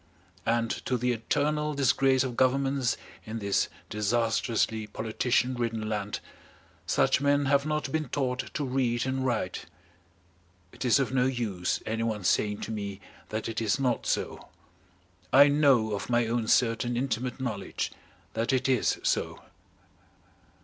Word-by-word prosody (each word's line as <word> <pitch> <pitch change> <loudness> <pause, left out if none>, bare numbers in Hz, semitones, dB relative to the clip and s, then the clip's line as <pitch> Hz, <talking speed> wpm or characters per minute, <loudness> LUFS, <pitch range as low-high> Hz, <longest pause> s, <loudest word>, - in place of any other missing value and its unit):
And 115 0 +1 0.2
to 125 - +1
the 125 +1 +1
eternal 150 +6 0
disgrace 135 -1 +3
of 125 -3 -4
governments 135 0 +2 0.3
in 110 +1 -5
this 100 -2 0 0.2
disastrously 110 0 0
politician 115 +3 0
ridden 115 -3 -2
land 105 -1 -3 0.7
such - - +3
men 145 0 +3
have 140 +1 +2
not 150 -3 -1
been 155 -3 -1
taught 130 -2 -2
to 145 - -1
read 125 -2 0
and 130 0 -1
write. 115 -8 -2 1.0
It - - -7
is 120 - +5
of 135 -1 -1
no 125 -1 +3
use 110 -9 -2
anyone 110 -2 -2
saying 105 +3 +1
to - - -4
me 100 -2 -4 0.3
that 110 0 -3
it 115 0 -3
is 110 +3 +1
not 125 -3 0
so. - - -2 0.8
I 140 +2 +8
know 140 -7 +4
of 100 - -4
my 120 -1 +3
own 115 0 -1
certain 120 +1 +2
intimate 125 0 -2
knowledge 110 -7 -3 0.4
that 115 +3 0
it 130 0 +1
is 130 -4 +2
so. - - 0
120 Hz, 140 wpm, -28 LUFS, 110-135 Hz, 1.0 s, I